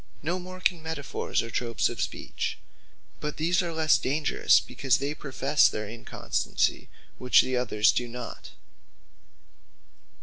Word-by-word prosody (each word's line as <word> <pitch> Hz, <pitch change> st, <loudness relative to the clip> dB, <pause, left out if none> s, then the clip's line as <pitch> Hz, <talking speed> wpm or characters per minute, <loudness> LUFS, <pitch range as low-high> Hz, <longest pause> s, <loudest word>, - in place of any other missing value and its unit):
No 175 Hz, +4 st, -1 dB
more 185 Hz, +1 st, -9 dB
can 180 Hz, -2 st, +1 dB
Metaphors, 160 Hz, -7 st, -2 dB
and 115 Hz, -, -8 dB
Tropes 115 Hz, -2 st, 0 dB
of -, -, -4 dB
speech: -, -, -3 dB, 0.6 s
but 150 Hz, 0 st, -4 dB
these 170 Hz, +4 st, +2 dB
are 175 Hz, -2 st, -3 dB
less 160 Hz, -1 st, +3 dB
dangerous, 140 Hz, -8 st, +3 dB
because 125 Hz, +6 st, 0 dB
they 140 Hz, +1 st, -2 dB
profess 140 Hz, 0 st, +2 dB
their 105 Hz, -1 st, -4 dB
inconstancy; 115 Hz, +2 st, -2 dB, 0.3 s
which 125 Hz, 0 st, +5 dB
the 130 Hz, -, -2 dB
other 115 Hz, -4 st, -2 dB
do 120 Hz, +2 st, +4 dB
not. 120 Hz, 0 st, -8 dB
140 Hz, 135 wpm, -27 LUFS, 120-160 Hz, 0.6 s, which